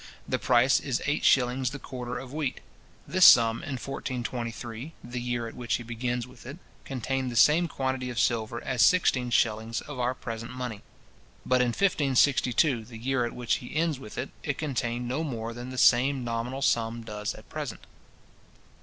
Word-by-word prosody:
The -, -, 0 dB
price 125 Hz, +2 st, +4 dB
is 130 Hz, -4 st, -2 dB
eight 145 Hz, +1 st, 0 dB
shillings 125 Hz, 0 st, +3 dB
the 140 Hz, -, -6 dB
quarter 125 Hz, -2 st, -6 dB
of 130 Hz, 0 st, -8 dB
wheat. 150 Hz, -4 st, -2 dB, 0.5 s
This 185 Hz, +1 st, +2 dB
sum 115 Hz, -5 st, +8 dB
in 145 Hz, -, -6 dB
1423, 120 Hz, 0 st, -5 dB
the 120 Hz, +1 st, -5 dB
year 120 Hz, -1 st, -2 dB
at 115 Hz, -, -8 dB
which 120 Hz, -2 st, -2 dB
he 120 Hz, -, -4 dB
begins 120 Hz, +1 st, -3 dB
with 125 Hz, -1 st, -15 dB
it, 140 Hz, +4 st, -7 dB, 0.3 s
contained 130 Hz, 0 st, -2 dB
the -, -, -6 dB
same 160 Hz, +8 st, +5 dB
quantity 130 Hz, -3 st, -2 dB
of 120 Hz, -, -6 dB
silver 115 Hz, -1 st, 0 dB
as 125 Hz, -3 st, 0 dB
sixteen 130 Hz, -9 st, +4 dB
shillings 110 Hz, -1 st, +1 dB
of 145 Hz, -3 st, -8 dB
our 125 Hz, +1 st, 0 dB
present 115 Hz, 0 st, -6 dB
money. 125 Hz, -5 st, -5 dB, 0.6 s
But 125 Hz, 0 st, +3 dB
in 125 Hz, -, +3 dB
1562, 135 Hz, -, +2 dB
the 115 Hz, 0 st, -10 dB
year 125 Hz, +1 st, 0 dB
at 120 Hz, -, -5 dB
which 125 Hz, -1 st, 0 dB
he 125 Hz, -, -10 dB
ends 160 Hz, -3 st, +1 dB
with 105 Hz, -5 st, -10 dB
it, 130 Hz, -, -4 dB
it 140 Hz, -2 st, -2 dB
contained 125 Hz, -5 st, -2 dB
no 135 Hz, +6 st, -1 dB
more 115 Hz, -6 st, -4 dB
than 120 Hz, +2 st, -7 dB
the 130 Hz, -, -7 dB
same 130 Hz, +2 st, +4 dB
nominal 120 Hz, +3 st, -3 dB
sum 115 Hz, -1 st, +1 dB
does 105 Hz, -2 st, -4 dB
at -, -, -14 dB
present. -, -, -6 dB
125 Hz, 180 wpm, -28 LUFS, 115-135 Hz, 0.6 s, sum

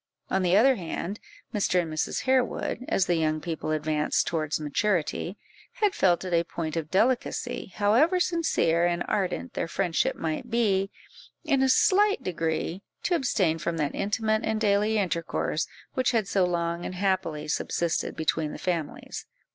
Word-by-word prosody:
On 190 Hz, -, +2 dB
the 180 Hz, +1 st, +4 dB
other 260 Hz, +4 st, +5 dB
hand, 180 Hz, +3 st, -4 dB, 0.3 s
Mr. 200 Hz, -4 st, +2 dB
and 165 Hz, -3 st, -2 dB
Mrs. 155 Hz, -, -1 dB
Harewood, 255 Hz, -1 st, 0 dB
as 190 Hz, -, +2 dB
the 175 Hz, -, +1 dB
young 155 Hz, -1 st, +1 dB
people 160 Hz, -1 st, -4 dB
advanced 155 Hz, -1 st, +1 dB
towards 155 Hz, -2 st, -1 dB
maturity, 170 Hz, +4 st, -1 dB, 0.4 s
had 415 Hz, -3 st, +1 dB
felt 180 Hz, 0 st, +2 dB
it 180 Hz, -, -3 dB
a 170 Hz, 0 st, +4 dB
point 165 Hz, -2 st, -4 dB
of 160 Hz, -2 st, -3 dB
delicacy, 245 Hz, +2 st, 0 dB
however 245 Hz, -, +3 dB
sincere 325 Hz, -, +2 dB
and 175 Hz, 0 st, 0 dB
ardent 185 Hz, -, -1 dB
their -, -, -2 dB
friendship 170 Hz, 0 st, 0 dB
might 160 Hz, +8 st, -3 dB
be, 200 Hz, -5 st, +2 dB, 0.5 s
in 280 Hz, -4 st, +2 dB
a 265 Hz, -, +3 dB
slight 400 Hz, +3 st, +4 dB
degree 165 Hz, 0 st, -2 dB, 0.2 s
to -, -, +1 dB
abstain 195 Hz, -, +1 dB
from 170 Hz, 0 st, -2 dB
that 150 Hz, -2 st, -1 dB
intimate 215 Hz, +2 st, 0 dB
and 220 Hz, 0 st, 0 dB
daily 210 Hz, +1 st, +2 dB
intercourse 170 Hz, -4 st, -1 dB, 0.3 s
which 255 Hz, 0 st, +1 dB
had 220 Hz, -4 st, +1 dB
so 195 Hz, -2 st, +2 dB
long 170 Hz, -1 st, -1 dB
and 185 Hz, -, -5 dB
happily 180 Hz, -5 st, -1 dB
subsisted 165 Hz, +2 st, -1 dB
between 160 Hz, -1 st, -1 dB
the -, -, -6 dB
families. 170 Hz, -5 st, -4 dB
185 Hz, 160 wpm, -27 LUFS, 165-220 Hz, 0.5 s, other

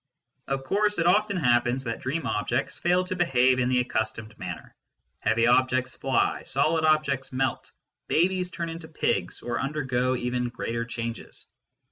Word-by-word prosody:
Of 135 Hz, 0 st, -2 dB
course 210 Hz, +9 st, +1 dB
it 165 Hz, -, +1 dB
often 200 Hz, +2 st, +3 dB
happens 120 Hz, -3 st, +2 dB
that 115 Hz, -2 st, -3 dB
dream 140 Hz, +3 st, -2 dB
objects 120 Hz, +3 st, -1 dB
fail 180 Hz, +2 st, +2 dB
to 185 Hz, 0 st, -4 dB
behave 130 Hz, -7 st, +3 dB
in 125 Hz, 0 st, +1 dB
the 125 Hz, -1 st, +3 dB
accustomed 110 Hz, -2 st, -3 dB
manner: 90 Hz, -3 st, -7 dB, 0.5 s
heavy 115 Hz, +1 st, +2 dB
objects 130 Hz, +1 st, +2 dB
fly, 135 Hz, -, 0 dB
solid 160 Hz, +4 st, +1 dB
objects 150 Hz, -4 st, +1 dB
melt, 130 Hz, 0 st, -2 dB, 0.4 s
babies 180 Hz, +2 st, +2 dB
turn 170 Hz, -1 st, -4 dB
into 165 Hz, 0 st, -7 dB
pigs 160 Hz, -, -1 dB
or 120 Hz, -1 st, -2 dB
undergo 130 Hz, -3 st, 0 dB
even 125 Hz, 0 st, -1 dB
greater 115 Hz, 0 st, -3 dB
changes. 115 Hz, -1 st, -6 dB
130 Hz, 150 wpm, -26 LUFS, 120-160 Hz, 0.5 s, often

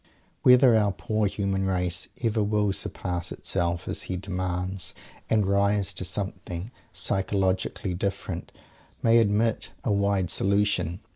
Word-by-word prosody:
Whether 125 Hz, -1 st, +7 dB
our 105 Hz, -2 st, +3 dB
poor 110 Hz, +1 st, 0 dB
human 95 Hz, -1 st, -1 dB
race 90 Hz, -2 st, +1 dB, 0.2 s
ever 110 Hz, -1 st, +2 dB
will 105 Hz, -1 st, +1 dB
surpass 90 Hz, -2 st, -4 dB
itself, 85 Hz, -1 st, -2 dB
as -, -, -2 dB
he 90 Hz, -, -1 dB
demands, 90 Hz, -1 st, -3 dB, 0.3 s
and 105 Hz, -2 st, +3 dB
rise 100 Hz, 0 st, +2 dB
to -, -, -4 dB
something 95 Hz, +1 st, -3 dB, 0.2 s
psychologically 95 Hz, +1 st, 0 dB
different, 95 Hz, +2 st, -3 dB, 0.5 s
"may 115 Hz, 0 st, +6 dB
admit 110 Hz, +1 st, +1 dB
a 115 Hz, -, 0 dB
wide 100 Hz, -3 st, +1 dB
solution." 95 Hz, -3 st, +1 dB
100 Hz, 125 wpm, -26 LUFS, 90-105 Hz, 0.5 s, Whether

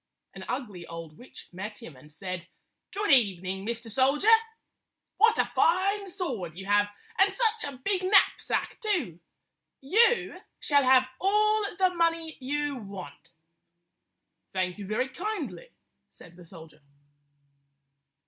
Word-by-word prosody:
An -, -, -9 dB
ugly 205 Hz, -10 st, -5 dB
old 165 Hz, -2 st, -9 dB
witch 250 Hz, +9 st, -13 dB
met 205 Hz, +4 st, -7 dB
him 160 Hz, -, -11 dB
and 150 Hz, +4 st, -17 dB
said, 185 Hz, +1 st, -6 dB, 0.4 s
"Good 415 Hz, -2 st, -1 dB
evening, 190 Hz, -6 st, +2 dB
Mr. 235 Hz, 0 st, -3 dB
Soldier! 270 Hz, -, +3 dB, 0.8 s
What 445 Hz, +2 st, +5 dB
a -, -, 0 dB
fine 390 Hz, +3 st, +2 dB
sword 235 Hz, -, -4 dB
you 190 Hz, +2 st, -8 dB
have, 205 Hz, +1 st, +3 dB, 0.3 s
and 390 Hz, +1 st, +5 dB
such 450 Hz, +1 st, 0 dB
a 265 Hz, -, -12 dB
big 370 Hz, +8 st, -1 dB
knapsack, 390 Hz, +1 st, +2 dB
too! 345 Hz, -, -1 dB, 0.6 s
You 455 Hz, -, +2 dB, 0.2 s
shall 285 Hz, -2 st, +2 dB
have 260 Hz, 0 st, +5 dB
all 425 Hz, +2 st, +3 dB
the 370 Hz, -1 st, +2 dB
money 330 Hz, -2 st, 0 dB
you 290 Hz, +1 st, -2 dB
want." 190 Hz, -, -10 dB, 1.2 s
"Thank 185 Hz, 0 st, -2 dB
you 200 Hz, -, -7 dB
very 215 Hz, +5 st, 0 dB
kindly," 415 Hz, -, -5 dB, 0.4 s
said 170 Hz, -1 st, -16 dB
the 175 Hz, -1 st, -14 dB
soldier. 160 Hz, -3 st, -14 dB
260 Hz, 130 wpm, -28 LUFS, -, 1.2 s, What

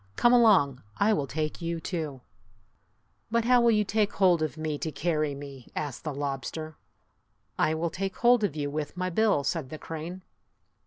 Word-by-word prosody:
Come 240 Hz, 0 st, +4 dB
along. 195 Hz, -, +5 dB, 0.2 s
I 215 Hz, +2 st, +3 dB
will 145 Hz, -8 st, -1 dB
take 155 Hz, +4 st, -3 dB
you, 170 Hz, 0 st, -2 dB
too! 155 Hz, -6 st, -4 dB, 0.6 s
" 110 Hz, +3 st, -43 dB
"But 230 Hz, 0 st, +1 dB
how 250 Hz, 0 st, +5 dB
will 235 Hz, -, +5 dB
you 210 Hz, -2 st, +4 dB
take 205 Hz, 0 st, 0 dB
hold 180 Hz, -4 st, +4 dB
of 155 Hz, 0 st, -2 dB
me 155 Hz, -2 st, -3 dB
to 160 Hz, -, -3 dB
carry 150 Hz, -1 st, -1 dB
me?" 140 Hz, -3 st, -10 dB
asked 145 Hz, -4 st, -4 dB
the 155 Hz, -, -3 dB
lobster. 145 Hz, +3 st, -4 dB, 0.8 s
"I 155 Hz, -, +2 dB
will 165 Hz, +1 st, -1 dB
take 195 Hz, 0 st, -3 dB
hold 240 Hz, -2 st, +4 dB
of 200 Hz, -8 st, 0 dB
you 145 Hz, -2 st, -2 dB
with 150 Hz, +3 st, -4 dB
my 185 Hz, 0 st, -1 dB
bill," 205 Hz, -6 st, +2 dB
said 150 Hz, -3 st, -2 dB
the 155 Hz, -, -6 dB
crane. 165 Hz, +4 st, -7 dB
160 Hz, 190 wpm, -28 LUFS, 145-195 Hz, 0.8 s, along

